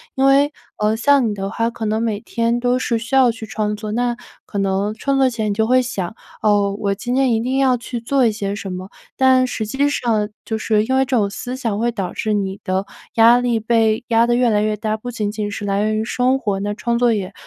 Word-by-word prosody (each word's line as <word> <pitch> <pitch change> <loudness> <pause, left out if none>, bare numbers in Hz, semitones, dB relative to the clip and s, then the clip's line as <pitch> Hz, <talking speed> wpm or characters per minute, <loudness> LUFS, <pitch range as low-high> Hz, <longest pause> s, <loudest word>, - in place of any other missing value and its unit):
因 265 - 0
为， 280 +2 +4 0.2
呃 210 +1 +1
像 265 0 +3
你 - - -2
的 195 0 -4
话， 230 +3 -1
可 235 -1 -8
能 215 +1 0
每 220 -3 -1
天 230 0 -1
都 245 +1 +1
是 235 -2 0
需 230 +2 -8
要 260 -2 +6
去 225 0 -8
创 210 -1 -2
作， 210 0 -6
那 240 +2 0 0.3
可 205 - -6
能 195 +1 0
创 275 +5 -1
作 265 -1 +4
前 220 -3 -2
你 - - 0
就 220 +2 +1
会 255 +1 +4
想： 220 -7 -4 0.3
哦， 205 -2 +2
我 200 -1 0
今 240 +4 -4
天 260 -2 +2
一 225 - +1
定 255 +3 -1
要 265 -2 +3
去 240 0 -5
做 260 +3 +1
一 225 - +3
些 200 -2 -3
什 200 -2 -6
么。 185 +1 -6 0.3
但 260 -1 +4
实 230 -3 -3
际 275 +7 0
上， 220 -7 0 0.2
就 220 - -2
是 215 -1 +1
因 260 +3 0
为 265 - +4
这 260 -1 0
种 205 -3 +1
思 245 +5 -6
想 230 -6 -2
会 240 +1 +1
导 195 -6 -4
致 215 - -2
你 200 -1 -2
的 190 +1 -1 0.3
压 235 +2 +6
力 240 -2 +1
被 225 +1 +1
压 230 0 +4
得 240 0 +2
越 245 0 +3
来 210 -2 +2
越 215 0 0
大， 215 0 -1
不 245 +3 -7
仅 215 -3 -2
仅 210 -1 -4
是 205 0 -5
来 200 0 0
源 215 0 0
于 220 - -1
生 255 +3 +1
活， 205 -5 -2
那 205 +1 -2
创 235 +2 -1
作 240 -1 +3
也 195 -2 -3
225 Hz, 275 characters per minute, -19 LUFS, 210-245 Hz, 0.3 s, 要